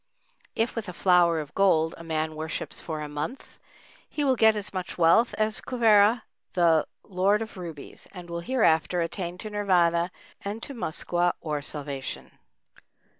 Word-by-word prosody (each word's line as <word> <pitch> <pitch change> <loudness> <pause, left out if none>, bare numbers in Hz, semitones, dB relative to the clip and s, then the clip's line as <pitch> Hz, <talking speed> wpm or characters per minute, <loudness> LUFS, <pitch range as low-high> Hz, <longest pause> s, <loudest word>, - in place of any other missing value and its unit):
If 225 +2 0
with 220 -4 -4
a - - -6
flower 175 -2 +4
of 150 -1 -7
gold 165 -5 +3
a 165 - -11
man 160 -1 -2
worships 160 +1 -5
for 155 -2 -5
a 150 - -4
month, 150 - -6 0.5
he 295 - -2
will 265 -2 +3
get 220 -2 +5
as 205 -2 -5
much 185 0 -5
wealth 175 +8 +4
as 215 0 +1
Kuvera, 225 -2 +4 0.3
the 165 -3 +3 0.2
Lord 200 +3 +1
of 220 - -11
Rubies, 170 -6 -9
and 180 -2 -10
will 170 0 -4
hereafter 175 -5 +2
attain 175 +1 -3
to 215 +3 -7
Nirvâna 175 -4 +2 0.3
and 210 +3 -5
to 280 - -6
Muskwa, 175 -4 -1
or 150 -2 -3
Salvation. 140 -2 -6
180 Hz, 160 wpm, -26 LUFS, 160-210 Hz, 0.5 s, get